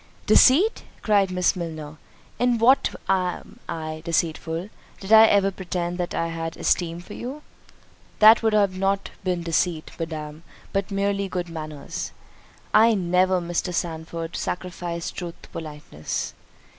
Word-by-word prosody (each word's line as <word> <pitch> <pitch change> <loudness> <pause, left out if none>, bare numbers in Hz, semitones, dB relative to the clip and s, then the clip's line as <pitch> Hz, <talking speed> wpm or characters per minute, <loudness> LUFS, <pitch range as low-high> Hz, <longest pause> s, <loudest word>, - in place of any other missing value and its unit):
"Deceit!" 350 - +5 0.2
cried 200 -3 +3
Miss 180 0 +1
Milner, 160 -3 -6 0.4
"in 245 -1 +3
what 250 +4 +4
am 185 -2 -1
I 155 -1 -4
deceitful? 165 +3 -2 0.3
did 200 +3 -1
I 220 0 +10
ever 200 -1 +3
pretend 180 -1 -4
that 175 - -2
I 165 - -1
had 165 0 -4
an - - -10
esteem 170 -1 0
for - - -11
you?" 275 +5 -7 0.7
"That 220 +2 +8
would 220 -1 +2
not 195 -1 +1
have - - -24
been 180 -2 -1
deceit, 165 -1 0
Madam, 155 -2 -5 0.3
but 195 0 -1
merely 200 0 -1
good 180 -1 -3
manners." 155 -3 -6 0.6
"I 225 +1 +6
never, 185 0 +2
Mr. 175 +1 -2
Sandford, 165 -1 -4
sacrificed 175 -2 -4
truth 175 -2 -6
to - - -14
politeness." 150 - -5
180 Hz, 140 wpm, -24 LUFS, 165-200 Hz, 0.7 s, I